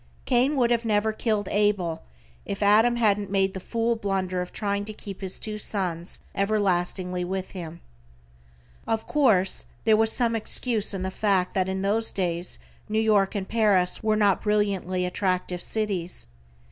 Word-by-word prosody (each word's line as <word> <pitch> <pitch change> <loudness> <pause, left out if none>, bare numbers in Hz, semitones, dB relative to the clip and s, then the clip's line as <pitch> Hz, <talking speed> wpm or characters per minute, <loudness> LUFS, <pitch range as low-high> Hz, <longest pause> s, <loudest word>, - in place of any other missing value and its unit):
Cain 260 +3 +2
would 245 -3 +2
never 220 -1 +1
have 215 - -16
killed 215 -4 0
Abel 200 -6 +1 0.4
if 200 +1 -4
Adam 220 +4 +5
hadn't 210 -3 +1
made 195 -1 +1
the 190 - -5
fool 230 +4 -1
blunder 190 -4 -2
of 180 - -6
trying 200 -1 -2
to 215 - -7
keep 200 -2 -9
his 190 -1 -3
two 215 -1 -4
sons 180 -5 -2
everlastingly 185 -3 0
with 190 +1 -4
him. 170 -3 -8 1.1
Of 225 0 -1
course 215 -11 +2 0.2
there 220 -1 +5
was 220 +1 +3
some 235 -1 +1
excuse 220 -1 +1
in 185 - -3
the 190 - -3
fact 190 -2 +1
that 190 -1 0
in 190 0 -2
those 220 +3 +3
days 175 -2 -1 0.3
New 215 - -1
York 210 -3 +2
and 195 -2 -3
Paris 205 -5 +2
were 215 -1 +1
not 205 -3 +2
brilliantly 195 -3 0
attractive 180 -1 -1
cities. 200 -5 -2
200 Hz, 160 wpm, -25 LUFS, 185-215 Hz, 1.1 s, Adam